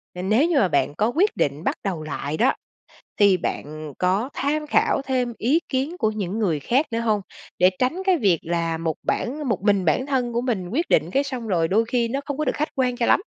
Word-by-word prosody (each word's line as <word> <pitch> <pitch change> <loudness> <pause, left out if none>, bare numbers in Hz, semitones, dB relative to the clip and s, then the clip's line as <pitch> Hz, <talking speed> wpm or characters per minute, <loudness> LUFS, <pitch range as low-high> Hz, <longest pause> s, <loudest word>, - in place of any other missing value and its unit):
nếu 215 - +2
như 335 -5 +1
mà 190 - +4
bạn 145 - +1
có 215 - +2
quyết 395 +6 +2
định 145 +2 -1
bắt - - 0
đầu 180 -6 -3
lại 155 0 -4
đó, 255 +4 +3 0.7
thì 200 -2 +5
bạn 155 -2 -5
có 195 +8 +1
tham 300 +2 -1
khảo 430 -2 +2
thêm 250 -3 -1
ý 280 +9 +2
kiến 280 +7 -2
của 220 -7 +1
những 205 0 -3
người 170 -9 +1
khác 265 - +1
nữa 230 - -1
hông? 215 -3 +1 0.4
Để 180 +1 +6
tránh 260 +9 0
cái 370 -2 +4
việc 190 - +2
là 165 -1 -1
một 160 -1 -2
bản 280 +1 -2
một 200 - 0
mình 200 -3 +2
bản 210 - +2
thân 250 -4 -1
của 235 - 0
mình 210 -8 -2
quyết 325 +9 -1
định 165 +4 +2
cái 275 +5 +2
xong 255 -5 -5
rồi 170 -4 +1
đôi 220 +5 +2
khi 235 0 0
nó 270 +4 -2
không 285 -1 -4
có 305 - -1
được 255 - 0
khách 305 +2 -1
quan 250 -2 0
cho 235 - +1
lắm. - - +4
230 Hz, 240 wpm, -23 LUFS, 180-270 Hz, 0.7 s, Để